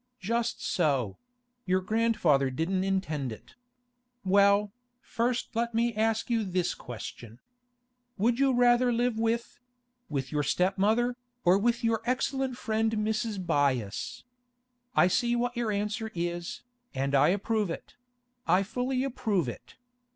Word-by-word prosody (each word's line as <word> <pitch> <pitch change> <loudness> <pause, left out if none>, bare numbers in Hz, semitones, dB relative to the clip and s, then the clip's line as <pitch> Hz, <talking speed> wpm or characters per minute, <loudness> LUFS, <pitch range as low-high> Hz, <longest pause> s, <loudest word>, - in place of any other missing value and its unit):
Just 230 +4 -1
so; 135 - 0 0.5
your 185 +1 +3
grandfather 185 -10 +2
didn't 165 +8 -1
intend 160 -9 -1
it. 110 - -11 0.7
Well, 200 +1 +4 0.3
first 240 +1 -2
let 235 0 -1
me 235 +1 +2
ask 225 +1 0
you 230 -2 +1
this 180 -2 -1
question. 120 -1 -9 0.8
Would 235 +4 +2
you 275 -1 +4
rather 245 0 +4
live 240 -1 0
with—with 240 - -4
your 150 -1 +1
stepmother, 205 - +1 0.3
or 180 +3 +5
with 235 +3 +1
your 225 -1 +1
excellent 255 +1 -1
friend 220 -1 0
Mrs. 215 -2 -1
Byass? 135 - 0 0.7
I 175 - +6
see 240 +6 +1
what 245 +1 -1
your 235 -2 -1
answer 210 +2 -2
is, 175 0 -3 0.3
and 135 +1 -1
I 135 - +5
approve 205 +1 0
it; 165 - -7 0.5
I 180 +3 +4
fully 255 +5 -1
approve 225 - 0
it. 120 - -8
215 Hz, 130 wpm, -29 LUFS, 175-240 Hz, 0.8 s, I